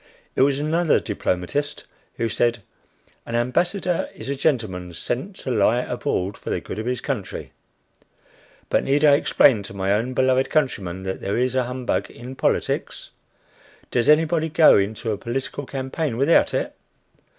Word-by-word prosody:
It - - +2
was 135 0 +4
another 160 +3 +2
diplomatist, 105 +8 -2 0.3
who 120 -3 -1
said 120 -1 0 0.6
"An 115 - -5
ambassador 175 +9 0
is - - -8
a 140 - -1
gentleman 105 - -1
sent 185 - -3
to 130 - -3
lie 115 +2 +3
abroad 100 -6 -2
for - - -7
the - - 0
good 105 - -7
of 110 - -4
his 125 0 -1
country." 125 -9 -4 1.2
But - - +1
need 145 +3 +2
I 145 - +7
explain 135 -5 +4
to 100 0 -9
my 95 0 +1
own 120 +5 -1
beloved 130 +1 +2
countrymen 95 - -1
that 95 0 -4
there 100 - -1
is 125 +1 +1
humbug 125 -1 -1
in 125 +3 -9
politics? - - -1 0.8
Does 120 +1 +2
anybody 160 +1 +3
go 160 0 +6
into 110 +3 0
a 105 - -3
political 135 +4 -4
campaign 135 -1 -3
without 140 +6 +4
it? - - -2
125 Hz, 155 wpm, -23 LUFS, 110-145 Hz, 1.2 s, I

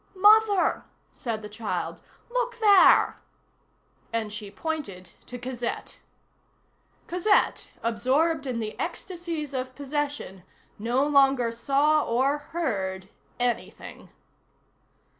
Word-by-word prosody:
"Mother," 415 0 +5 0.3
said 225 -3 -5
the - - -6
child, 210 +1 -4 0.3
"look - - -1
there!" 410 -4 +6 0.9
And 220 -2 -2
she 210 -1 -7
pointed 200 - -5 0.2
to 250 - -7
Cosette. 245 -1 -5 1.1
Cosette, 365 +4 +1
absorbed 270 +7 +1
in 245 -3 -2
the 215 -1 -4
ecstasies 335 -6 -4
of 255 -1 -4
possession, 285 -9 -4 0.4
no 240 +6 +1
longer 270 -4 +4
saw 280 +6 +2
or 265 +5 +1
heard 195 - -3 0.3
anything. 245 -1 -3
270 Hz, 95 wpm, -26 LUFS, 230-320 Hz, 1.1 s, there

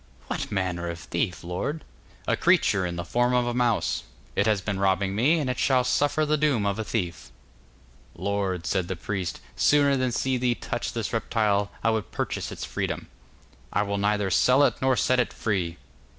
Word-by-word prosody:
'What - - -4
manner 90 -3 -1
of 85 - -4
thief, 85 0 -3
lord?' 90 - -3 0.4
'A - - +2
creature 95 -2 +3
in 85 - -4
the 85 0 -4
form 120 +5 +2
of 125 -1 +3
a 120 - -1
mouse. 120 -2 +1 0.3
It 100 - +2
has 105 -2 +3
been 95 +1 -3
robbing 95 0 +1
me, 135 +11 +3
and 150 -4 -1
it 125 - -2
shall 130 -2 +3
suffer 145 +4 +2
the 155 +1 +2
doom 140 -9 +2
of 100 +1 0
a - - 0
thief.' 90 -7 -3 0.9
'Lord,' 95 -4 -2
said 95 -3 0
the 95 - -3
priest, 90 0 -4
'sooner 145 -1 +4
than 130 -1 0
see 130 +2 0
thee 125 -1 +1
touch 120 - -4
this 115 -3 -3
reptile, 105 -3 +1
I 115 - +3
would 110 -2 -2
purchase - - -3
its - - -5
freedom.' - - -3 0.6
'I 105 - +2
will 100 0 -2
neither 105 -1 +1
sell 130 +8 +5
it - - +4
nor 130 -1 +3
set 130 0 +2
it 125 - +1
free. 90 -6 -2
105 Hz, 195 wpm, -26 LUFS, 95-125 Hz, 0.9 s, sell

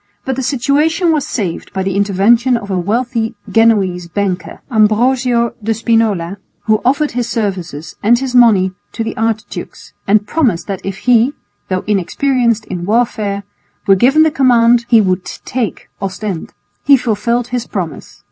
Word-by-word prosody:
But 265 - -1
the 265 - -3
situation 295 +6 +1
was 305 -3 0
saved 190 -8 -4
by 190 -1 -2
the 190 0 -2
intervention 210 +5 +3
of 205 -3 -7
a 185 - 0
wealthy 225 +4 -1
Genoese 195 -6 +2
banker, 185 0 -3
Ambrosio 235 +2 +2
de 225 +1 -1
Spinola, 215 -5 0 0.3
who 215 -1 +1
offered 285 +4 +1
his 240 0 -2
services 180 -9 -4
and 235 +3 +4
his 260 0 -4
money 215 -7 +5 0.2
to 225 - -3
the 225 - -4
archdukes 225 -1 -4
and 205 +1 +3
promised 220 - 0
that 195 -2 -5
if 195 -1 -4
he, 245 +2 +4 0.4
though 185 -1 -1
inexperienced 230 +3 0
in 175 -1 -5
warfare, 210 -2 0 0.4
were 195 - +5
given 265 +11 +4
the 315 - +2
command, 240 -3 +3
he 230 - +6
would 185 -2 0
take 235 +1 -5
Ostend. 195 -2 -4 0.3
He 280 -1 +6
fulfilled 235 0 -1
his 245 -1 -3
promise. 170 -7 -6
225 Hz, 155 wpm, -15 LUFS, 195-245 Hz, 0.4 s, he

